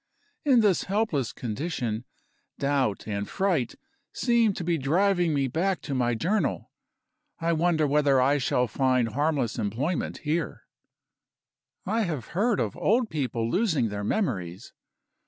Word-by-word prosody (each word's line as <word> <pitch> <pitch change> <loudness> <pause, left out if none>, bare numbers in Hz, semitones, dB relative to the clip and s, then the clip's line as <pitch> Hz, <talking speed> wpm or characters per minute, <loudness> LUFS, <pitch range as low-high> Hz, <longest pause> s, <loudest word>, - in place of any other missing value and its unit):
In 260 -5 +5
this 205 -5 +2
helpless 195 - 0
condition, 120 -2 -3 0.5
doubt 140 -8 0
and 100 -1 -3
fright 175 - 0 0.4
seem 235 -3 +2
to 175 - -5
be 170 -1 0
driving 175 +4 +2
me 140 -2 +1
back 175 +7 0
to 140 - -5
my 120 -2 +1
Journal. 190 - -1 0.7
I 170 0 +1
wonder 165 -1 +2
whether 145 -2 +3
I 140 +3 +3
shall 125 -1 +1
find 130 0 +1
harmless 140 -2 0
employment 125 - -2
here. 155 -1 -2 1.2
I 220 +4 0
have 155 - -3
heard 210 +5 +1
of - - -1
old 230 +2 +1
people 125 -7 -1
losing 160 - +1
their 105 0 -4
memories. 100 - -2
150 Hz, 135 wpm, -27 LUFS, 125-185 Hz, 1.2 s, In